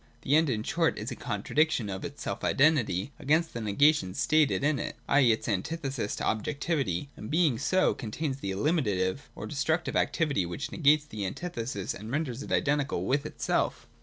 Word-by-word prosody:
The 140 - +3
End 160 -1 +4
in 110 -4 -1
short - - +1
is - - -4
a - - -4
contradiction 155 -7 0
of 95 -1 -5
its 145 0 -7
self - - -4
identity 135 - +2
against 160 +4 +1
the 115 - -4
negation 110 -2 +3
stated 155 -3 +2
in 145 -1 +2
it, - - -4
i.e. 135 -5 +5
its 110 - -1
antithesis 130 - -2
to - - -5
objectivity, 140 - -1
and 105 - -8
being 155 -7 +2
so, 185 0 +2
contains 135 +4 -4
the 100 - -5
eliminative 105 - 0
or - - -6
destructive 160 +4 -1
activity 150 - +1
which 85 0 -5
negates 150 -1 +4
the 110 -8 -6
antithesis 115 - -4
and 110 +2 -8
renders 135 -2 -2
it - - -8
identical 145 -1 +1
with 140 +3 0
itself. - - -1
140 Hz, 175 wpm, -29 LUFS, 110-155 Hz, -, i.e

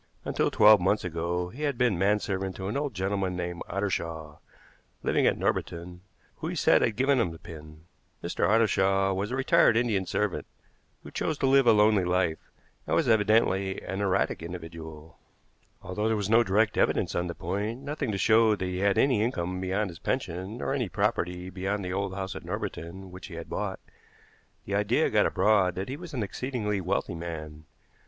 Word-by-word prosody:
Until - - +1
twelve 105 -2 +6
months 100 +4 +1
ago 85 +1 -2
he 125 +10 -10
had 145 -4 -1
been 125 -5 +2
manservant 95 0 0
to 95 - -5
an 105 - -3
old 140 -4 -2
gentleman 95 0 -1
named 90 -1 -4
Ottershaw, 85 -6 -3 0.7
living - - +2
at - - +2
Norbiton, 90 +1 -2 0.4
who - - -5
he - - -3
said - - +4
had 115 - +1
given 135 +3 +2
him 105 - +1
the 80 - -9
pin. 80 -1 -12 0.4
Mr. - - 0
Ottershaw 95 -3 +3
was 95 +2 -2
a 125 - -2
retired 135 -2 +4
Indian 105 -6 +1
servant, 105 -4 -1 0.6
who - - -10
chose 155 - -2
to - - 0
live 135 -1 +4
a - - +8
lonely 105 -2 +4
life, 90 -2 0 0.4
and - - +1
was 160 - +2
evidently 105 -3 +2
an 95 +1 -4
erratic 95 -4 0
individual. 80 -2 -9 0.6
Although 105 +4 -2
there 110 -1 +1
was 105 0 -2
no 115 +1 +6
direct 105 +1 +1
evidence - - +1
on 90 0 -1
the 85 - -5
point, 105 +8 -3
nothing 145 -4 -3
to 100 - -2
show 110 +1 +4
that 95 - -4
he 90 0 -3
had 100 0 +2
any 130 -6 +3
income 90 -5 -2
beyond 95 +1 -1
his 80 - -12
pension, 95 -4 -3
nor 135 - -2
any 125 -8 -1
property 90 -3 -1
beyond 95 +2 -3
the 90 - -3
old 100 -1 -2
house 95 0 -4
at - - -7
Norbiton 95 +3 -6
which 90 +1 -9
he 85 - -9
had 85 0 -8
bought, - - -3 0.9
the 100 - -5
idea 100 0 +2
got - - +4
abroad 100 -4 +2
that 95 +4 -4
he 135 - -3
was 175 +2 -9
an 120 - -1
exceedingly 105 -2 -3
wealthy 90 0 -1
man. 80 -2 -7
95 Hz, 190 wpm, -28 LUFS, 90-110 Hz, 0.9 s, a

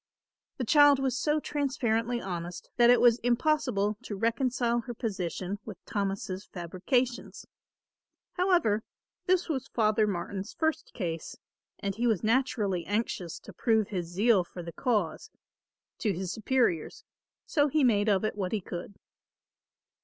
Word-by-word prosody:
The 250 - -2
child 290 +2 +6
was 265 -1 0
so 300 +3 +1
transparently 245 -5 -1
honest 175 -4 -6
that 240 -1 +6
it 245 - +7
was 240 -1 +5
impossible 245 -5 +1
to 225 -5 -6
reconcile 235 +2 +1
her 240 0 -6
position 195 -2 -3
with 215 -4 -8
Thomas' 195 -1 -3
fabrications. 200 +8 -2 0.9
However, 355 - +2 0.5
this 370 0 +3
was 270 -5 -2
Father 215 -1 +2
Martin's 195 +1 -4
first 315 -1 -1
case 165 -6 -4 0.4
and 200 0 -3
he 235 +4 0
was 220 -6 +1
naturally 215 -6 +1
anxious 205 -5 -2
to - - -12
prove 220 -3 +1
his 180 -4 -3
zeal 195 +3 +3
for 175 0 -9
the 170 0 -8
cause, 210 - -1 0.7
to 210 -4 +1
his 185 0 -4
superiors, 235 - 0 0.4
so 290 -2 +2
he 295 +1 +2
made 215 -4 +3
of 195 -1 +2
it 215 - -2
what 190 -2 -3
he 215 - +1
could. 180 +1 -7
220 Hz, 140 wpm, -29 LUFS, 195-255 Hz, 0.9 s, it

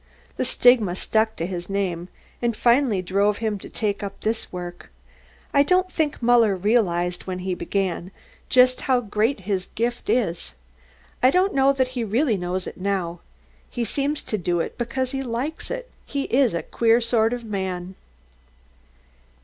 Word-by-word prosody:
"The - - 0
stigma 230 -8 +4
stuck 220 +3 +1
to 165 - -3
his 175 0 -5
name, 185 -3 -2 0.3
and 235 -2 0
finally 235 -6 +3
drove 200 +3 +1
him 215 -3 -2
to - - -9
take 205 -3 -2
up 200 -1 -6
this 220 +1 -2
work. 175 -1 -7 0.6
I 280 - +6
don't 365 +5 +2
think 300 -6 -1
Muller 230 -4 +5
realised, 180 -4 +1
when 185 -1 -3
he 185 0 -2
began, 185 -1 -2 0.4
just 255 0 +5
how 255 -2 +2
greatly 215 +1 0
he 205 - -4
is 190 -1 -1
gifted. 235 -5 0 0.8
I 255 - +6
don't 370 +6 +2
know 270 0 +4
that 260 -2 +1
he 250 -2 -3
really 230 +3 +1
knows 180 0 -3
now. 185 -3 -2 0.5
He 240 -1 -2
seems 285 +6 -1
to 215 - -2
do 175 0 0
it - - -3
because 255 +2 -2
he 270 - -2
likes 265 +5 -3
it - - -4 0.2
he's 275 - +1
a 170 - -2
queer 230 0 +3
sort 230 -1 +2
of 245 -1 -3
man." 190 -3 -4
220 Hz, 160 wpm, -23 LUFS, 185-250 Hz, 0.8 s, I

